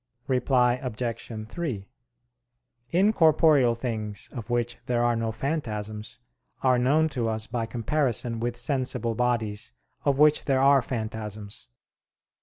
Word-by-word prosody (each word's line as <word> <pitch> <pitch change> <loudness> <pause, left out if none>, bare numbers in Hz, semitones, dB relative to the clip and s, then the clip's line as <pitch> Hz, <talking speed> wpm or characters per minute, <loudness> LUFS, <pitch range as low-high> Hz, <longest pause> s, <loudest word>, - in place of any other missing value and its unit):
Reply 125 -1 +2
Obj. 115 -2 -4
3: 120 - -4 1.0
Incorporeal 160 - +4
things, 110 -4 -4
of 120 -3 -7
which 120 0 -1
there 120 -1 +1
are 120 0 +2
no 115 -1 -1
phantasms, 110 -5 -4 0.5
are 130 -2 +4
known 150 +6 +3
to 120 -6 -1
us 110 0 -3
by 115 -1 -3
comparison 120 -1 -1
with 120 +1 -2
sensible 125 -2 -1
bodies 110 - -1 0.3
of 140 -1 +2
which 150 +1 +4
there 135 -2 +2
are 135 0 +5
phantasms. 110 -3 -6
120 Hz, 120 wpm, -26 LUFS, 110-135 Hz, 1.0 s, are